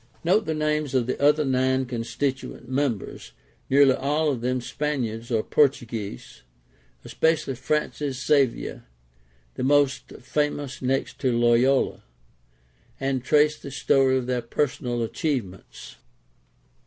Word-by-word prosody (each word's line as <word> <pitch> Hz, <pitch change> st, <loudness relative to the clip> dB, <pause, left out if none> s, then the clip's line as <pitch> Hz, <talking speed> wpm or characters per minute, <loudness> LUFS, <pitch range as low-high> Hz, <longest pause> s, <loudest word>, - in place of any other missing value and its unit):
Note 195 Hz, +6 st, +2 dB
the 160 Hz, -, -1 dB
names 150 Hz, -2 st, -1 dB
of 125 Hz, -2 st, +2 dB
the 130 Hz, -, -3 dB
other 150 Hz, +1 st, +4 dB
nine 130 Hz, 0 st, +1 dB
constituent 125 Hz, +3 st, -4 dB
members 130 Hz, -5 st, -3 dB, 0.4 s
(nearly 135 Hz, 0 st, +6 dB
all 150 Hz, +4 st, 0 dB
of 125 Hz, -4 st, -4 dB
them 125 Hz, +1 st, 0 dB
Spaniards 120 Hz, -4 st, -3 dB
or 110 Hz, -3 st, +1 dB
Portuguese), 120 Hz, -7 st, -1 dB, 0.6 s
especially 160 Hz, -4 st, 0 dB
Francis 145 Hz, 0 st, -2 dB
Xavier, 140 Hz, -5 st, +1 dB, 0.7 s
the -, -, -4 dB
most 140 Hz, 0 st, +2 dB
famous 145 Hz, 0 st, -3 dB
next 135 Hz, +1 st, -1 dB
to 130 Hz, -2 st, +1 dB
Loyola, 120 Hz, +3 st, +2 dB, 1.0 s
and 135 Hz, -2 st, -1 dB
trace 150 Hz, +3 st, +3 dB
the -, -, -8 dB
story 135 Hz, -1 st, +2 dB
of 130 Hz, -, -2 dB
their 125 Hz, -1 st, -1 dB
personal 120 Hz, -1 st, -2 dB
achievements. 115 Hz, -, -4 dB
135 Hz, 115 wpm, -25 LUFS, 125-145 Hz, 1.0 s, nearly